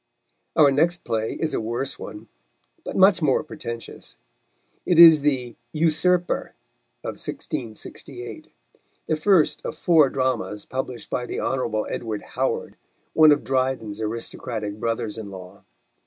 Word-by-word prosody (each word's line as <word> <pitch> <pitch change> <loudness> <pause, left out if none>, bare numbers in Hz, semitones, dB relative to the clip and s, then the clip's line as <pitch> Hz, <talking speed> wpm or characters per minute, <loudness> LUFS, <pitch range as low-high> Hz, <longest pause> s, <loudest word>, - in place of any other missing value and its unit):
Our 150 -4 +6
next 170 +5 +1
play 110 -1 -1
is 160 -1 -2
a - - 0
worse 120 +5 -3
one, 105 +2 -9 0.6
but - - -6
much 190 -1 +5
more 140 -4 +2
pretentious. 115 -7 -8 0.7
It 175 - +1
is 165 -3 +10
the 130 -5 0 0.2
Usurper, 170 +3 +1 0.5
of - - -5
1668, 120 +2 -6 0.6
the 160 - +1
first 165 0 +3
of - - -5
four 160 -5 +5
dramas 130 -6 -2
published 130 -2 -5
by 125 - -2
the - - -4
Hon. 115 -5 -1
Edward 110 -3 -4
Howard, - - -2 0.4
one 155 -1 +7
of 145 - +3
Dryden's 130 -5 -1
aristocratic 110 -1 -4
brothers 115 -2 -2
in 105 -2 -7
law. 95 0 -11
130 Hz, 130 wpm, -24 LUFS, 110-155 Hz, 0.7 s, is